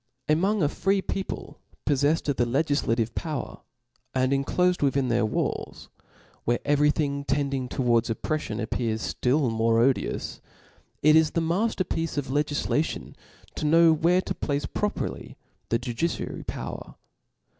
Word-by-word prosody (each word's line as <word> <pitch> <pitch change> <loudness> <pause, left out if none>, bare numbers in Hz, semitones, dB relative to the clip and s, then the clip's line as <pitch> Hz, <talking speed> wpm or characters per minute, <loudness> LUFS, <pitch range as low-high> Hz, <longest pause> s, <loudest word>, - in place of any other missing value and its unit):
Among 185 +6 +2
a - - +4
free 195 +5 0
people 170 -6 -5 0.3
pofleffed 145 +2 +2
oJF 145 -2 0
the 120 - +3
legillativc 120 -4 0
power, 155 -4 -4 0.6
and 130 0 +2
enclofcd 180 +6 +1
within 140 -2 +2 0.2
walls, - - -3 0.5
where 120 +1 +2
every 145 +1 +4
thing 140 -2 0
tending 140 -2 -1
towards 120 -3 +1
oppreffiort 115 -1 -2
appears 110 -1 -2
ftill 130 0 +1
more 115 0 +2
odious, 130 +3 0 0.6
it 155 +1 +7
is 160 -1 +5
the 165 - -1
mafter 185 +4 0
piece 165 -2 -2
of 145 -2 -2
legiflation 145 +2 -1 0.4
to - - -5
know 165 +1 +6
where 170 +4 +3
to - - -3
place 145 -1 -2
properly 210 0 -3 0.3
the 115 - +2
judiciary 125 +7 -3
power. - - -6
145 Hz, 135 wpm, -26 LUFS, 125-160 Hz, 0.6 s, it